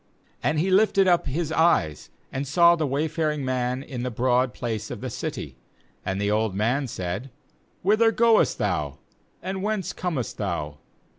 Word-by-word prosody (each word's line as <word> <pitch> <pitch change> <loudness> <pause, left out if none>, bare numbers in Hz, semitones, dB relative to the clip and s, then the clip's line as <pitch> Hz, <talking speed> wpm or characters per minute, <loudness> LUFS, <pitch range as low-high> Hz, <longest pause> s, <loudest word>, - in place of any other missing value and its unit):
17And 150 +5 +1
he 180 +5 +1
lifted 195 0 +4
up 175 -2 +3
his 155 +3 -2
eyes, 160 - +2 0.2
and 135 +2 -3
saw 170 +4 +6
the 160 -3 -1
wayfaring 150 +1 -1
man 125 0 -1
in 130 -4 -6
the 125 - -2
broad 125 +1 +1
place 110 -4 -4
of - - -6
the 130 +1 -5
city; 125 - -5 0.5
and 95 +1 -2
the 100 0 0
old 110 -2 0
man 125 +7 +1
said: 95 +5 -4 0.3
' - - -39
Whith 210 +4 +3
er 225 -1 +6
goest 230 -1 +3
thou? - - -1 0.5
and 190 0 -3
whence 200 -3 -2
comest 160 -10 -3
thou?' 85 -7 -3
135 Hz, 170 wpm, -25 LUFS, 115-170 Hz, 0.5 s, saw